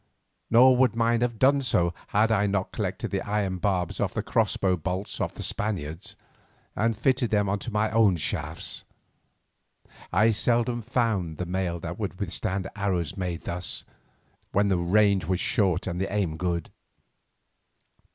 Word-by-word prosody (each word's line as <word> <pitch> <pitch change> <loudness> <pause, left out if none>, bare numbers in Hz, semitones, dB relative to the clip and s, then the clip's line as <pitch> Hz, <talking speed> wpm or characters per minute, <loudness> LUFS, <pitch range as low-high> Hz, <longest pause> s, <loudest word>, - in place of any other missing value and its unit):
Nor 125 +2 +6
would 125 -3 +3
mine 115 0 +2
have 120 -2 0
done 140 +4 +4
so 85 -9 +1
had 110 +2 +2
I 105 -2 +3
not 100 -1 -1
collected - - -3
the - - -1
iron 100 -3 -1
barbs 90 -3 -1
off - - -1
the - - -1
crossbow 95 -2 +1
bolts 90 +4 -4
of - - -2
the - - -6
Spaniards, 95 -2 -3 0.6
and 115 0 +1
fitted 130 0 +1
them 100 -2 +1
to 120 - -5
my 105 +1 +1
own 110 -4 +4
shafts. 75 - -1 1.3
I 110 +5 +4
seldom 120 +2 +1
found 110 - -1
the 90 - -3
mail 90 -1 -2
that 85 +4 -6
would 100 -3 -4
withstand 95 0 -2
arrows 95 -5 -1
made 90 -4 -4
thus, 85 -3 -4 0.7
when 100 0 +3
the 95 - +2
range 100 0 +3
was 90 +1 0
short 95 -5 +1
and 90 0 -3
the 95 - -2
aim 95 -6 0
good. 85 0 -2
100 Hz, 155 wpm, -26 LUFS, 90-110 Hz, 1.3 s, Nor